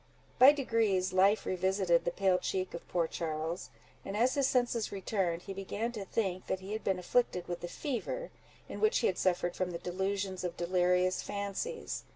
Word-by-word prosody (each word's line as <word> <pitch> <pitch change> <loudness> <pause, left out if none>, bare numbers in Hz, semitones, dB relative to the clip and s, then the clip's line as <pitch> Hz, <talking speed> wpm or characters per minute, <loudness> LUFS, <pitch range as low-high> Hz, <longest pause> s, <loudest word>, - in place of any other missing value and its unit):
By 260 +3 +10
degrees 225 -10 +1
life 195 +3 +4
revisited 185 -2 +2
the 175 - +1
pale 185 0 +2
cheek 185 -1 -2
of 170 - -8
poor 170 -2 +1
Charles; 160 +1 -3 0.3
and 195 - -4
as 245 +4 +3
his 280 -2 +2
senses 245 -4 +1
returned, 190 -3 -1
he 195 - -6
began 200 +4 -3
to 210 -4 -6
think 190 -4 -2
that 190 - -1
he 190 +2 -6
had 220 - -4
been 190 -1 +1
afflicted 180 0 0
with 175 -1 -3
the 175 - -5
fever, 405 - -4 0.4
in - - -7
which 435 +2 +4
he - - +1
had 185 - +1
suffered 175 -1 +1
from 185 -1 -1
the 170 - -4
delusions 190 +2 -2
of 175 -1 -3
delirious 180 +1 +2
fancies. 200 - -4
190 Hz, 190 wpm, -32 LUFS, 180-220 Hz, 0.4 s, By